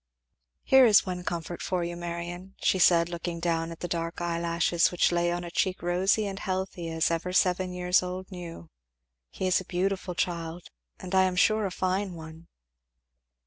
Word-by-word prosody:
"Here 265 -2 +6
is 205 -3 +6
one 180 -1 -4
comfort 170 0 -4
for 180 -2 -1
you, 170 0 -4
Marion," 175 +2 -6
she 190 - +2
said 170 -1 +5
looking 170 0 -5
down 165 -1 -1
at 165 - -10
the 175 - -2
dark 165 0 -3
eyelashes 170 0 +1
which 180 - +2
lay 175 0 +1
on 175 0 -3
a 170 - -7
cheek 185 +1 -1
rosy 185 +5 +2
and 195 -1 -5
healthy 185 -3 -3
as 160 +1 0
ever 165 +2 -2
seven 185 0 +2
years 180 0 +2
old 185 +1 -6
knew; 170 - -9 0.6
"he 190 - -5
is 185 0 +3
a - - -8
beautiful 185 0 -2
child, 170 0 -3 0.4
and 180 - -8
I 190 0 +5
am 185 -1 -1
sure, 215 +2 +3
a - - -6
fine 185 +1 -1
one." 160 0 -11
175 Hz, 185 wpm, -27 LUFS, 170-185 Hz, 0.6 s, Here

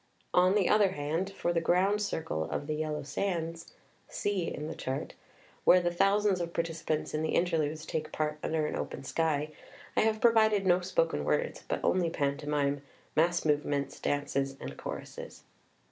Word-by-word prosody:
On 185 +2 +5
the 200 -4 +3
other 205 -3 +4
hand, 160 +6 -2
for 175 -3 -1
the 165 - +1
ground 190 +5 +2
circle 160 - -2
of - - -3
the 155 - -2
"Yellow 150 -1 -2
Sands" 165 +1 -3 0.4
[C. 200 -4 -1
in 150 - -5
the 160 - -4
Chart], 130 -2 -4 0.5
where 185 - +7
the 175 -1 0
thousands 195 +1 +3
of 170 0 -4
partici 165 -1 -3
pants 155 -1 -1
in 155 - 0
the 160 - 0
Interludes 160 -3 0
take 155 -1 -3
part 150 0 -2
under 155 -1 0
an - - -2
open - - -4
sky, 155 0 0 0.4
I - - +4
have 220 0 +2
provided 220 -4 +4
no 180 -1 +5
spoken - - 0
words, 485 - -1
but - - -2
only 180 -2 +2
pantomime, 145 -1 0 0.3
mass 170 +2 +2
movements, 145 -2 0
dances 140 -1 -1
and - - -6
choruses. - - -7
165 Hz, 170 wpm, -30 LUFS, 150-185 Hz, 0.5 s, where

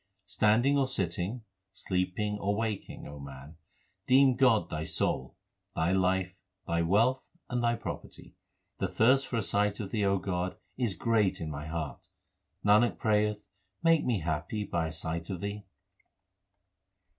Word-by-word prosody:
Standing 120 +7 +3
or 135 - +2
sitting, 100 0 -2 0.3
sleeping 95 +2 -2
or 100 +1 0
waking, 110 -2 -3
O 70 0 -9
man, 70 +2 -10 0.5
deem 130 0 +6
God 120 -9 +4
thy 80 0 -2
soul, 65 -4 -1 0.4
thy 80 +3 +1
life, 95 0 +1 0.3
thy 85 0 0
wealth, 115 +10 +2 0.2
and 125 -1 0
thy 120 0 +2
property. 115 - -8 0.5
The - - 0
thirst 130 +4 +3
for 120 - -2
a 110 - 0
sight 105 +1 +1
of 100 -3 -5
Thee, 105 -2 0
O 100 0 +3
God, 90 -1 -2 0.2
is 120 -7 -1
great 110 -5 +1
in 80 -2 -4
my 75 +1 -6
heart; 80 -3 -5 0.6
Nanak 105 +4 +4
prayeth 105 -1 +1 0.4
make 165 -1 +4
me 115 -7 0
happy 85 +6 -2
by 85 -5 -1
a - - -5
sight 80 +1 -3
of 95 -3 -3
Thee. 100 +2 -5
100 Hz, 150 wpm, -30 LUFS, 85-115 Hz, 0.6 s, deem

